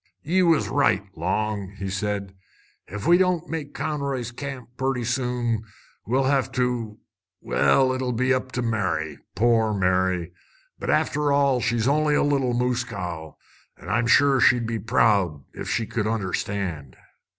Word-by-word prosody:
"Ye 180 +5 +2
was 165 -4 +3
right, 140 -9 +2
Long," 105 -2 -2
said 100 0 -3 0.5
he. 100 - -9
"Ef 105 - -5
we 175 +2 +5
don't 180 -2 +1
make 155 -3 -5
Conroy's 140 -5 -3
Camp 130 -1 -7
purty 130 -1 -1
soon, 120 -2 -1 0.5
we'll 130 +4 +2
hev 135 -1 +1
to 120 -4 -1 0.4
well, 130 -1 +2
it'll 130 -1 -2
be 130 +3 +1
up 130 0 -2
to 125 - -1
Mary! 95 -9 -1 0.2
Poor 110 -1 +2
Mary! 90 -2 0 0.5
But, - - -4
after 150 0 +1
all, 140 -3 +3
she's 115 0 0
only 150 +1 +2
a - - +3
little 135 -4 +1
moose 125 0 0
cow. 90 -9 -6 0.4
An' - - -10
I'm 115 +2 +1
sure 140 +2 +5
she'd 120 -1 +4
be 115 0 -2
proud, 105 - +2
ef - - -6
she 115 - 0
could 105 -1 -2
understand!" 95 - -3
120 Hz, 150 wpm, -24 LUFS, 105-135 Hz, 0.5 s, we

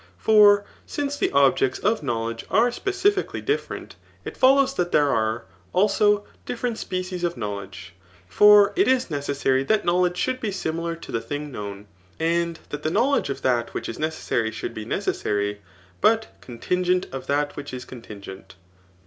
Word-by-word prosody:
For 205 -2 +5 0.2
since 285 -1 -2
the - - 0
objects 135 -2 +3
of 215 +2 0
knowledge 115 -4 -3
are 225 +6 +3
specifically 390 +6 0
different, 430 +2 -3 0.3
it - - -6
follows, 270 +1 +4
that 175 -9 -1
there 145 -1 +3
are, 110 0 0 0.3
also, 205 +1 +3 0.2
different 240 -1 -3
species 185 -1 -4
of 175 0 0
knowledg£i 100 -1 -6 0.4
For 205 - +6
it 385 - +3
is 255 -7 +2
necessary 140 -2 0
that 215 +4 +1
knowledge 180 0 +2
sliould 255 0 -2
be 215 - -2
similar 170 -2 -3
to 165 - -11
the 115 - -1
tiling 145 +2 -5
knowx^ 100 -3 -7 0.3
and 170 0 0
that 145 - -5
the 155 - -1
knowledge 245 - +1
of 140 0 -5
that 120 -2 0
which - - -3
is 115 - -6
necessary 155 -7 -1
should 110 +1 -6
be 110 - -6
necessary, 105 -1 -2 0.4
but 220 0 +3
contingent 180 +9 -1
of 135 - -7
that 145 +1 0
which 145 0 -7
is 125 -1 -7
contingent. 100 -6 -11
165 Hz, 160 wpm, -24 LUFS, -, 0.4 s, For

